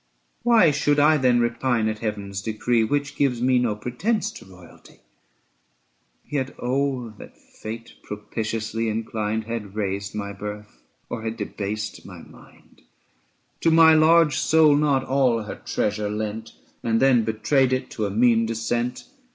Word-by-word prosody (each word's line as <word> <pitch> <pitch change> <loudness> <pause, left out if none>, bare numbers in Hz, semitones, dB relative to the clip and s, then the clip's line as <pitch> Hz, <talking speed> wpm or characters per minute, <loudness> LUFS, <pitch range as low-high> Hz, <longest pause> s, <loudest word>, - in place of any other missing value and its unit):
360 240 - -2
Why 225 -9 +6 0.2
should 145 - +3
I 155 +2 +5
then 125 -3 +3
repine 120 -1 0
at 110 0 -3
Heaven's 100 -3 -4
decree 110 +2 0
Which 145 +5 -1
gives 130 -4 +1
me 125 +1 +3
no 120 -4 0
pretence 125 - -2
to - - -12
royalty? 90 -2 -17 1.3
Yet 135 -2 -3
oh 130 -2 -1
that - - -13
Fate, 115 +2 -9
propitiously 110 +1 -4
inclined, 110 0 -2
Had 110 -3 -6
raised 100 -1 -3
my 100 -1 -4
birth 105 -8 -8 0.3
or 115 - -5
had 110 0 -4
debased 105 +1 -5
my - - -11
mind, - - -19 0.8
To 165 - +2
my 160 0 +7
large 160 -2 +4
soul 155 -2 +4
not 145 -2 +2
all 130 -4 +1
her 105 - -8
treasure 105 0 -1
lent, 110 +1 -4 0.3
365 - - -4
And 115 - +3
then 130 -4 +4
betrayed 125 +5 +1
it 130 0 -2
to 110 -2 -2
a - - -4
mean 115 +2 +3
descent 120 +2 -2
115 Hz, 150 wpm, -23 LUFS, 105-135 Hz, 1.3 s, my